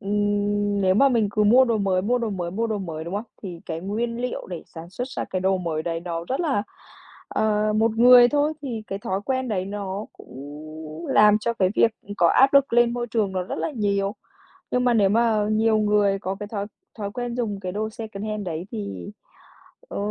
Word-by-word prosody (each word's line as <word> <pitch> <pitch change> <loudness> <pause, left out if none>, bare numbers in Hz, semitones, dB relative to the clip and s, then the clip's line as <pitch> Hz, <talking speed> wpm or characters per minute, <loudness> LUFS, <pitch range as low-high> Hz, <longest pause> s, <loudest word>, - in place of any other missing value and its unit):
ừm, 205 0 0
nếu 185 -1 +3
mà 275 +7 +5
mình 230 -5 +2
cứ 210 +1 +1
mua 245 +5 +6
đồ 230 -3 0
mới, 190 -2 +1
mua 245 +5 +1
đồ 230 -2 -2
mới, 180 -3 -3
mua 225 +6 -1
đồ 215 -2 -2
mới, 160 -5 -5
đúng 170 +3 -5
hông? 205 +3 -2 0.2
Thì 180 -4 -7
cái 160 -1 -4
nguyên 230 +5 -3
liệu 250 0 -4
để 175 -3 -6
sản 165 +1 -11
xuất 245 +7 -5
ra - - -4
cái 185 - -3
đồ 190 +1 +2
mới 165 -3 -2
đấy 165 0 -3
nó 170 -1 -4
rất 265 +4 -1
là 285 -12 +1 0.7
ờ, 215 0 +1
một 225 +1 +3
người 245 0 +8
thôi 295 +2 +1
thì 235 -6 -4
cái 195 - -4
thói 190 -1 -2
quen 260 +1 -1
đấy 190 -4 -1
nó 200 +1 -5
cũng 155 +4 -10
làm 210 0 +5
cho 235 +2 -1
cái 190 -5 +2
việc, 230 - +4
ừm, 205 - -8
có 170 - +4
áp 270 +10 +4
lực 275 -2 +5
lên 240 0 +4
môi 240 -1 -2
trường 220 -4 -1
nó 185 -1 -1
rất 180 - -5
là - - -1
nhiều. 200 -4 0 0.6
Nhưng 250 0 +1
mà 245 -1 +3
nếu 205 -3 +4
mà 220 0 +2
nhiều 220 0 +3
người 205 -2 +2
có 190 0 -4
cái 205 - -4
thói 205 -2 -4 0.3
thói 200 -1 -3
quen 245 0 -4
dùng 210 -5 -2
cái 185 -2 -4
đồ 215 +2 -2
secondhand 215 -2 -5
đấy 170 +1 -4
thì, 100 -4 -5 0.8
ờ, - - -5
205 Hz, 225 wpm, -24 LUFS, 185-230 Hz, 0.8 s, người